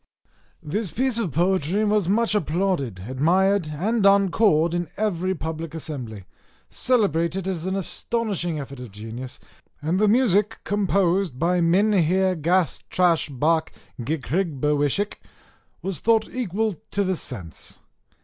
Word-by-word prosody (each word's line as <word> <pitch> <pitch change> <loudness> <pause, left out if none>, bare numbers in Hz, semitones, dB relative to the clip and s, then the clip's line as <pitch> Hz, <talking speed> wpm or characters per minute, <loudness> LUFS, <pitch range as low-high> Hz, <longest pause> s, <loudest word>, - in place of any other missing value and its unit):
This 200 +6 -2
piece 255 +4 0
of 195 -9 -1
poetry 180 +5 +1
was 205 -4 +2
much 225 +2 +2
applauded, 160 - -1
admired, 175 +7 +2
and 200 +9 -1
encored 195 -4 +4
in 175 -1 -1
every 190 -3 0
public 160 0 -5
assembly, 125 - -6 0.5
celebrated 190 - +1
as 180 -2 -3
an 190 - -1
astonishing 195 -3 -2
effort 140 -1 -8
of 125 -2 -8
genius; 115 +5 -8 0.4
and 160 +5 0
the 210 - +4
music, 210 -2 +3
composed 195 -5 +1
by 175 +4 +1
Minheer 185 0 +3
Gastrashbark 165 -2 +1 0.3
Gkrghhbarwskhk, 150 - -1 0.7
was 190 -5 -1
thought 225 +2 +3
equal 220 -3 -1 0.2
to 200 - 0
the 190 -1 0
sense! 95 - -6
180 Hz, 115 wpm, -24 LUFS, 155-200 Hz, 0.7 s, encored